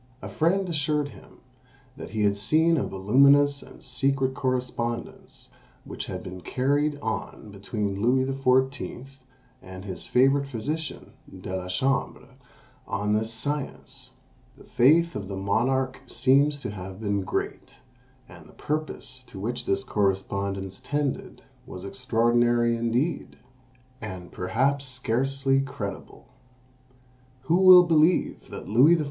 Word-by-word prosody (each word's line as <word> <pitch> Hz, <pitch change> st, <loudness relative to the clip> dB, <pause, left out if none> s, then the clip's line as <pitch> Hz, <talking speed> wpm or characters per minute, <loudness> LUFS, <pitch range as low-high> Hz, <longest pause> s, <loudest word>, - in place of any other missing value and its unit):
A -, -, -8 dB
friend 185 Hz, +4 st, +1 dB
assured 150 Hz, -3 st, -1 dB
him 100 Hz, -7 st, -16 dB, 0.5 s
that -, -, -9 dB
he 110 Hz, -1 st, -1 dB
had 100 Hz, -1 st, +3 dB
seen 160 Hz, +11 st, +2 dB
a 145 Hz, -, -1 dB
voluminous 140 Hz, +8 st, +4 dB
and -, -, -15 dB
secret 135 Hz, +1 st, 0 dB
correspondence 125 Hz, -3 st, -4 dB, 0.4 s
which -, -, -6 dB
had -, -, -6 dB
been 90 Hz, 0 st, -8 dB
carried 145 Hz, +7 st, 0 dB
on 110 Hz, -2 st, -5 dB
between 100 Hz, 0 st, -3 dB
Louis 130 Hz, +3 st, +3 dB
XIV. 135 Hz, 0 st, -1 dB, 0.4 s
and 95 Hz, +1 st, -10 dB
his 95 Hz, -3 st, -5 dB
favourite 135 Hz, +2 st, +3 dB
physician, 145 Hz, +5 st, -5 dB, 0.2 s
De 95 Hz, 0 st, -6 dB
la 90 Hz, -1 st, -4 dB
Chambre, 125 Hz, +5 st, -1 dB, 0.6 s
on 105 Hz, +1 st, -1 dB
this 110 Hz, +1 st, 0 dB
science. 140 Hz, +6 st, -5 dB, 0.5 s
The -, -, -15 dB
faith 165 Hz, +7 st, +3 dB
of 100 Hz, -2 st, -5 dB
the 100 Hz, -, -5 dB
monarch 130 Hz, +7 st, 0 dB
seems 140 Hz, +3 st, +3 dB
to -, -, -4 dB
have 95 Hz, -1 st, -8 dB
been 100 Hz, -2 st, -1 dB
great, 95 Hz, -, -4 dB, 0.5 s
and -, -, -14 dB
the -, -, -18 dB
purpose 150 Hz, -4 st, -4 dB
to 95 Hz, -, -10 dB
which 120 Hz, +4 st, -4 dB
this 100 Hz, 0 st, +1 dB
correspondence 95 Hz, -1 st, -2 dB
tended 145 Hz, -2 st, -3 dB, 0.2 s
was 90 Hz, +1 st, -8 dB
extraordinary 120 Hz, +1 st, +2 dB
indeed, 120 Hz, +7 st, -1 dB, 0.6 s
and 95 Hz, -5 st, -7 dB
perhaps 135 Hz, +10 st, 0 dB
scarcely 135 Hz, +2 st, 0 dB
credible. 135 Hz, -8 st, -7 dB, 1.2 s
Who 165 Hz, +6 st, +2 dB
will 185 Hz, -1 st, +9 dB
believe 165 Hz, 0 st, +2 dB
that -, -, -8 dB
Louis 130 Hz, +11 st, +6 dB
XIV. -, -, -1 dB
125 Hz, 130 wpm, -26 LUFS, 105-140 Hz, 1.2 s, will